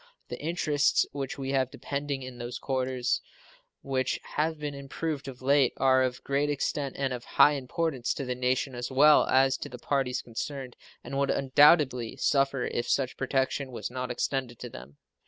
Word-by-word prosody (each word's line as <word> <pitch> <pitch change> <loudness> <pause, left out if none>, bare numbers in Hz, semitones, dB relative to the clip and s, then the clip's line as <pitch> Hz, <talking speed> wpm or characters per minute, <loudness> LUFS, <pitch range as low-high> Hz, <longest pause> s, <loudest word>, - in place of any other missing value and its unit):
The - - -6
interests 150 -3 +2
which 135 -1 -4
we 135 -1 -3
have 130 -2 +1
depending 140 0 -4
in 130 -1 -9
those 120 +1 -5
quarters, 130 -2 -1 0.6
which 130 -1 -1
have 160 +1 0
been 150 -1 -4
much 140 - -8
improved 145 +1 -4
of 130 -1 -9
late, 140 -1 +4
are 130 -1 +4
of 125 -1 -1
great 140 +1 0
extent 145 -1 -2
and 135 -2 -1
of 120 -1 -6
high 145 - +5
importance 140 -1 -2
to 140 - -4
the 125 - -1
nation 125 +2 0
as 120 0 -4
well 145 +3 +6
as 135 0 +4
to - - -7
the 125 - -8
parties 130 0 -1
concerned, 130 +2 -6 0.3
and 135 - -4
would 140 - +1
undoubtedly 135 -3 +4
suffer 135 -2 +1
if 120 - -2
such 135 -2 +1
protection 135 0 -1
was 120 - -5
not 125 0 -4
extended 125 -1 -2
to 125 0 -8
them. 65 +4 -11
135 Hz, 180 wpm, -28 LUFS, 125-140 Hz, 0.6 s, well